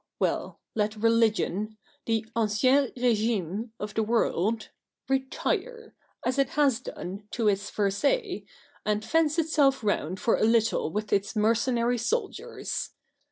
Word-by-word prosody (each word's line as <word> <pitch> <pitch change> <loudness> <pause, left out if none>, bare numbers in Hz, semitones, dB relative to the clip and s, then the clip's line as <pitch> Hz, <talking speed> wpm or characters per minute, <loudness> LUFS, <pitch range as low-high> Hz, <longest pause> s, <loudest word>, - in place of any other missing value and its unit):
Well, - - -1
let 210 0 0
religion 215 -2 +1
— - - -37
the 225 -1 +1
ancien 230 +5 +3
regime 220 -3 0
of 210 0 -5
the 220 - +1
world 220 -1 0 0.2
— - - -62
retire, 445 - -2 0.3
as 255 +2 0
it 275 - +3
has 275 -5 +4
done, 200 -4 -7
to 230 0 -1
its 200 -1 +1
Versailles, 280 - 0 0.4
and 210 0 0
fence 325 -1 +2
itself 295 -6 +3
round 185 -3 -1
for 230 - +2
a - - 0
little 225 -6 +3
with 210 +3 -2
its 200 +2 0
mercenary 235 +2 +2
soldiers 425 - -2
225 Hz, 135 wpm, -27 LUFS, 210-265 Hz, 0.4 s, has